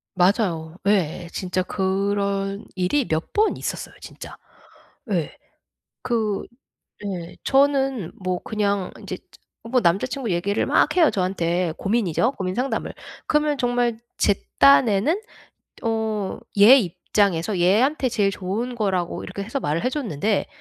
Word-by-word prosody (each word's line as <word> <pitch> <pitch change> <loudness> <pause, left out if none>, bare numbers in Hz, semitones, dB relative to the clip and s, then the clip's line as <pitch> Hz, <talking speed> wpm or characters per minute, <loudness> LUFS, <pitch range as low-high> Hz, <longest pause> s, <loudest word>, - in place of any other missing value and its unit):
맞아요. 175 -4 +1
예. 180 -3 +1
진짜 185 0 -2
그런 195 +1 -1
일이 185 +10 +1
몇 160 +1 -1
번 430 +1 +2
있었어요 - - -5
진짜. - - -10 0.8
예. 170 -5 -1 0.7
그 225 -5 -1 0.6
예. 180 -4 -5
저는 270 - +2
뭐 185 -1 -1
그냥 200 -3 -1
인제 - - -6 0.5
뭐 245 +2 +1
남자 175 +5 +2
친구 250 -2 -4
얘기를 195 +4 0
막 300 - +2
해요 325 -4 +6
저한테. 180 -3 0
고민이죠 220 - +1
고민 185 -4 -3
상담을. 260 +4 -2 0.3
그러면 300 -1 +2
정말 245 -2 0 0.2
제 200 - +3 0.2
딴에는 200 - +5 0.6
어 220 -3 -1 0.2
얘 235 +7 +9
입장에서 185 -1 0
얘한테 250 - +3
제일 205 -4 +1
좋은 210 +7 -3
거라고 190 -6 -1
이렇게 200 +2 -6
해서 235 +7 -3
말을 160 +9 -1
해 - - +3
줬는데 210 - -1
200 Hz, 255 characters per minute, -23 LUFS, 180-240 Hz, 0.8 s, 얘